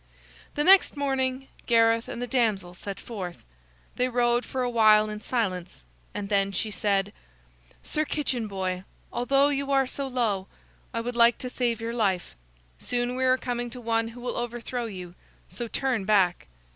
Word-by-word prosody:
The 295 - +1
next 380 -3 +6
morning 270 -1 -1 0.2
Gareth 230 -1 +4
and - - -6
the 245 - -2
damsel 220 -8 0
set 195 +2 -6
forth. 185 -7 -7 0.5
They 250 +1 +2
rode 240 0 +2
for 260 -1 -2
a 245 - 0
while 215 -2 +5
in 210 0 -6
silence, 185 - -2 0.3
and 205 -1 -3
then 200 -1 +2
she 215 +3 -1
said: 200 -1 0 0.7
"Sir 305 - -1
Kitchen 270 -7 -1
Boy, 185 -2 -3 0.3
although 275 +3 +3
you 280 -1 -1
are 270 -1 +3
so 275 +2 -3
low, 220 -7 0 0.4
I 230 - -2
would 245 +1 -4
like 235 0 +5
to 250 - -5
save 240 -3 0
your 230 +1 -3
life. 195 -6 0 0.4
Soon 245 0 -1
we 260 - -1
are 255 0 +4
coming 245 -1 -3
to 250 - -7
one 225 -1 0
who 235 +2 -10
will 245 0 -3
overthrow 240 0 -3
you; 180 -5 -7 0.4
so 240 - -4
turn 245 -1 -1
back." 190 -4 +2
235 Hz, 170 wpm, -27 LUFS, 205-250 Hz, 0.7 s, next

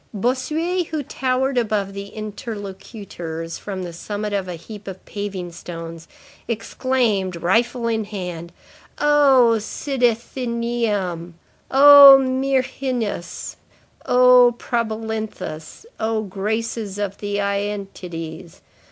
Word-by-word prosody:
Bossuet, 310 - -1
who 310 -2 -3
towered 260 0 0
above 210 -4 -1
the 200 0 -6
interlocutors 200 -5 -7
from 190 -2 -5
the 175 -1 -6
summit 205 +4 -4
of 195 -2 -1
a 180 - -5
heap 205 +4 -11
of 190 -1 -8
paving 195 -4 -5
stones, 165 -1 -8 0.4
exclaimed, 230 -4 -1
rifle 230 +8 +1
in 220 -2 0
hand:— 180 -5 -6 0.5
"Oh 275 -6 +5
Cydathenæum, 235 - -2 0.4
Oh 280 0 +10
Myrrhinus, 260 -5 -2 0.5
Oh 250 -1 +6
Probalinthus, 220 - -4
Oh 220 0 0
graces 210 +1 -3
of 200 -1 -3
the 205 -1 -3
Æantides! 195 -5 -4
215 Hz, 95 wpm, -21 LUFS, 190-250 Hz, 0.5 s, Oh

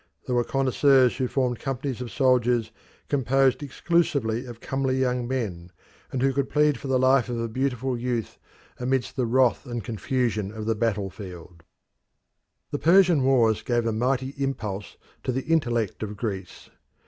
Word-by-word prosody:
There 125 - -2
were 120 0 +3
connoisseurs 135 0 +3
who 130 - 0
formed 125 -2 -1
companies 135 -2 -3
of 125 - -5
soldiers 125 -4 +2 0.4
composed 135 -1 +2
exclusively 140 -5 0
of 120 -1 -9
comely 135 0 -1
young 125 -2 0
men, 95 -10 -3 0.4
and 130 -1 -1
who 135 0 +3
could 140 0 -1
plead 150 -1 +2
for - - -7
the 130 -1 +2
life 130 0 +3
of 120 -1 -2
a 115 - -1
beautiful 130 +1 -1
youth 120 -3 -3 0.4
amidst 130 0 -1
the 125 -3 0
wrath 130 +1 +2
and 120 -2 -4
confusion 115 -2 -1
of 110 0 -6
the 115 - +1
battlefield. 95 -6 -4 1.1
The 145 - -2
Persian 175 -2 +5
wars 120 -5 +3
gave 120 -1 0
a 115 - +1
mighty 130 +4 0
impulse 110 -8 -4 0.2
to - - -2
the 130 +1 -2
intellect 120 - 0
of 105 -1 -5
Greece. 100 -5 -6
125 Hz, 160 wpm, -25 LUFS, 115-135 Hz, 1.1 s, Persian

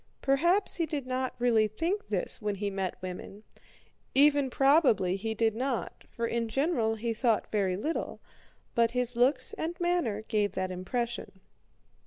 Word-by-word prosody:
Perhaps 345 +9 +3
he 335 -2 0
did 285 -3 -3
not 255 0 -2
really 235 -3 +3
think 335 - -2
this - - -2
when 210 -1 -1
he 200 +1 -3
met 195 -2 -3
women—even 265 +9 -1
probably 265 - +3
he 220 +3 -3
did 225 0 +2
not, 255 0 -3
for 235 - -3
in 230 0 -1
general 245 -4 +1
he 230 +1 -2
thought 225 -1 0
very 195 -4 +1
little—but 235 -3 -3
his 250 -1 0
looks 255 +2 +2
and 335 +2 -4
manner 345 - 0
gave 210 -2 0
that 185 0 -2
impression. 215 +2 -4
235 Hz, 145 wpm, -29 LUFS, 215-280 Hz, -, Perhaps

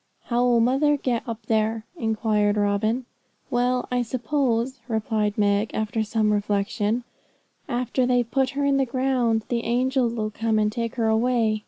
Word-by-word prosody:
'How 240 0 0
'll 245 -1 +4
mother 275 +5 +3
get 245 -4 -1
up 225 -1 -6
there?' 220 0 0
inquired 215 -5 +1
Robin. 210 +4 0 0.5
'Well, 250 0 +1
I 250 0 +1
suppose,' 250 0 -1
replied 220 -2 -1
Meg, 205 +1 +1
after 220 +1 -1
some 215 0 +1
reflection, 205 +3 0 0.7
'after 250 +1 0
they've 245 -2 +1
put 265 -2 +2
her 285 - +1
in 280 -1 +3
the 270 - +2
ground, 245 -3 0
the 235 -1 -1
angels 250 0 +1
'll 215 -2 -2
come 225 +1 0
and 210 0 +2
take 230 +1 -3
her 230 -3 0
away. 220 -1 +2
230 Hz, 160 wpm, -24 LUFS, 215-250 Hz, 0.7 s, ll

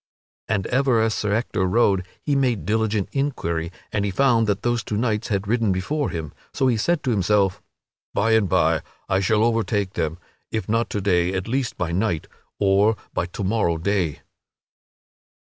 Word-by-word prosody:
And 100 -3 0
ever 130 -2 +2
as 110 0 +2
Sir 105 -2 -1
Ector 110 -3 0
rode 95 -2 +2 0.2
he 145 - +1
made 125 -6 +1
diligent 110 -2 0
inquiry 85 - -2 0.2
and 105 - +1
he 100 - 0
found 115 +2 +3
that 100 0 -1
those 120 -1 0
two 105 - -3
knights 110 -1 0
had 100 -1 -1
ridden 115 -2 +2
before 115 +11 -1
him, 80 -4 -5 0.2
so 135 - +1
he 125 -2 +3
said 155 +9 0
to 130 - 0
himself: 100 -2 +2 0.5
"By 110 +3 +1
and 110 -4 +3
by - - +3 0.3
I 95 - +2
shall 105 +3 +2
overtake 110 -4 0
them 80 +1 -2 0.3
if 110 - -3
not 115 +2 +1
to 105 - -2
day, 90 -1 +2
at 95 +1 -3
least 130 +1 -1
by 90 -2 -2
night, 90 -3 -1 0.3
or 100 +2 +3 0.2
by 85 - -1
to 95 - -6
morrow 95 -4 +1
day." 90 -3 -1
105 Hz, 180 wpm, -23 LUFS, 95-115 Hz, 0.5 s, found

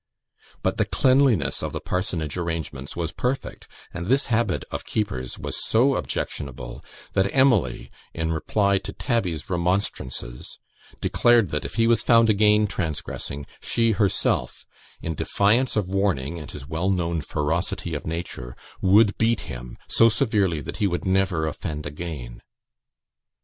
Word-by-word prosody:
But - - 0
the - - +2
cleanliness 130 - +3
of - - -4
the - - -2
parsonage 90 -5 -2
arrangements 80 -5 -4
was 85 -2 -2
perfect; 125 +10 -3 0.3
and 85 +1 -5
this 135 +4 +3
habit 110 -5 +1
of - - -4
Keeper's 65 - -3
was - - -2
so 130 +5 +3
objectionable, 60 - -4 0.3
that 95 +1 +2
Emily, 120 - +2 0.2
in 80 0 -2
reply 100 +5 +1
to - - -7
Tabby's 95 - -1
remonstrances, 85 -9 -2 0.4
declared 120 -6 +4
that, 75 0 -3
if - - -6
he 115 0 +3
was 115 0 +4
found 115 -2 +5
again 105 0 +4
transgressing, 75 -6 -4 0.2
she 115 -1 +2
herself, 100 -2 0 0.4
in 80 - -2
defiance 105 - +2
of 105 -3 +1
warning 90 -6 -1
and 75 - -9
his 70 -1 -9
well 80 +5 -1
known 85 -3 0
ferocity 75 +2 -2
of - - -4
nature, 80 -7 -5 0.3
would 100 +2 +5
beat 115 0 +2
him 60 -1 -8
so 115 - +5
severely 105 - +1
that - - -6
he 105 - +2
would 90 -2 -2
never 95 -4 +2
offend 75 -1 -4
again. 75 -5 -6
90 Hz, 145 wpm, -24 LUFS, 75-110 Hz, 0.4 s, found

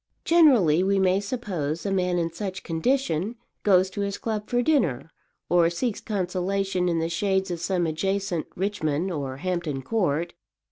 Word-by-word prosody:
Generally, 255 - +5
we 195 +1 +2
may 190 0 +3
suppose, 195 - -3
a 200 - -1
man 180 -2 +1
in 165 -1 -1
such 190 +1 -5
condition 195 - 0 0.3
goes 190 -2 +4
to 205 - -4
his 200 0 -2
club 215 -2 -4
for 245 - 0
his 245 - +2
dinner, 170 - +1 0.4
or 170 -1 +4
seeks 210 +6 -2
consolation 190 -2 -1
in 170 - 0
the 165 0 0
shades 190 +2 0
of 170 - -3
some 175 0 0
adjacent 190 +1 -1
Richmond 185 -3 -1
or 135 -5 -4
Hampton 165 -5 -3
Court. 170 - 0
185 Hz, 160 wpm, -25 LUFS, 165-200 Hz, 0.4 s, Generally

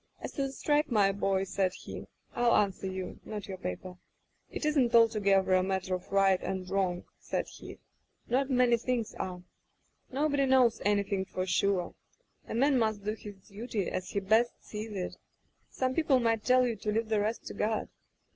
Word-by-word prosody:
As - - -6
to 280 - -4
the 270 -1 -1
strike, 295 +2 +1
my 205 -5 +4
boy,' 195 -1 0
said 190 -1 0
he, - - -8 0.3
'I'll 240 -1 +3
answer 195 -2 +1
you 190 -1 -5
— - - -37
not 210 -2 -6
your 190 -2 -6
paper. 180 - -6 0.5
It - - -5
isn't 270 -6 +2
altogether 200 -5 +4
a 185 - +5
matter 190 0 -1
of 180 0 -5
right 195 -1 +4
and 190 0 -4
wrong,* 185 -2 0 0.2
said - - -3
he, - - -11 0.3
* - - -44
not 265 +3 +1
many 250 -2 +4
things 235 -1 -2
are. 180 -1 -5 0.7
Nobody 280 0 +1
knows 255 -3 +4
anything 200 -1 +1
for 185 -1 -4
sure. 185 -1 +1 0.5
A - - -4
man 270 +2 +3
must 220 -3 0
do 210 - +1
his 205 -3 -11
duty 210 -2 -3
as 185 - -3
he 200 - -1
best 220 +5 +3
sees 215 +1 -6
it. 190 -3 -4 0.5
Some 260 0 -1
peo 325 - +1
ple 265 -4 +4
might 225 -2 +1
tell 255 +1 +4
you 235 -2 -1
to 210 +2 -2
leave 220 +1 -1
the 215 -1 +2
rest 215 +3 -2
to - - -6
God. 215 +1 -1
210 Hz, 195 wpm, -30 LUFS, 190-240 Hz, 0.7 s, a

